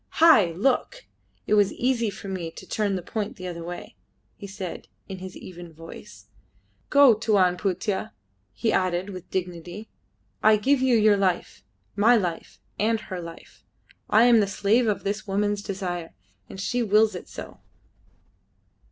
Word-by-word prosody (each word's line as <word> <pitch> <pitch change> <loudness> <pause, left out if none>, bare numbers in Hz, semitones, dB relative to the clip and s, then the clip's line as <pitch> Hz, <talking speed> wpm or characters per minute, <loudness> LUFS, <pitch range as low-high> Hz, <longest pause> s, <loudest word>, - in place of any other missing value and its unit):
"Hai, 320 - +7
look! 270 - 0 0.4
It - - 0
was 205 -2 +4
easy 240 -3 0
for 200 - -9
me 185 -4 -4
to - - -12
turn 205 -2 -1
the 180 - -4
point 215 +2 -4
the 185 - -9
other 170 -2 -5
way," 175 -8 -8 0.4
he 200 - -9
said 195 -3 -7 0.2
in 190 -1 -7
his 185 0 -8
even 175 -2 -10
voice. 165 +1 -12 0.6
"Go, 280 -4 +7
Tuan 205 -5 +2
Putih," 190 +2 -2 0.4
he 225 - -1
added 185 +1 0
with 185 -2 -9
dignity. 180 +3 -5 0.5
"I 215 0 +6
give 265 +5 +2
you 260 -2 +3
your 215 -1 +4
life, 185 - -1 0.3
my 225 +4 +5
life, 180 -7 -3 0.2
and 225 +1 +2
her 185 -4 -6
life. 165 0 -12 0.5
I 215 +2 +6
am 240 -2 +6
the 205 - +2
slave 210 +4 +2
of 210 - -1
this 210 +2 -3
woman's 205 +1 0
desire, 180 -4 -5 0.3
and 190 - -9
she 245 +5 -1
wills 215 0 +3
it - - -8
so." - - -9
200 Hz, 160 wpm, -25 LUFS, 180-220 Hz, 0.6 s, Hai